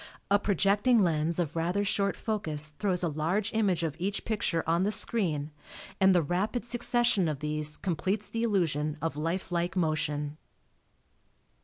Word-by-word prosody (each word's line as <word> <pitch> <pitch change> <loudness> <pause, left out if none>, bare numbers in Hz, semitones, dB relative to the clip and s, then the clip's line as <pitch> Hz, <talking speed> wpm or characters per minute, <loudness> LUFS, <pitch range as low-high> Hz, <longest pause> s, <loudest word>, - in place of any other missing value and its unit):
A 200 - +5
projecting 205 +5 +2
lens 165 -1 0
of 165 -3 -2
rather 175 +5 0
short 200 0 0
focus 155 -9 0
throws 185 -4 0
a - - +2
large 170 +9 -1
image 195 -6 +1
of 155 -3 -2
each 195 +3 -2
picture 195 -7 -1
on 165 +2 +2
the 205 - +1
screen, 160 -11 +2 0.5
and 190 -1 +5
the 175 - +3
rapid 195 - -1
succession 240 -5 +2
of 155 -2 -2
these 150 +1 -2
completes 190 +4 -2
the 230 - -4
illusion 160 -9 0
of 165 -2 -3
life 165 +5 -3
like 175 +1 -1
motion. 155 -3 -1
175 Hz, 155 wpm, -29 LUFS, 155-205 Hz, 0.5 s, A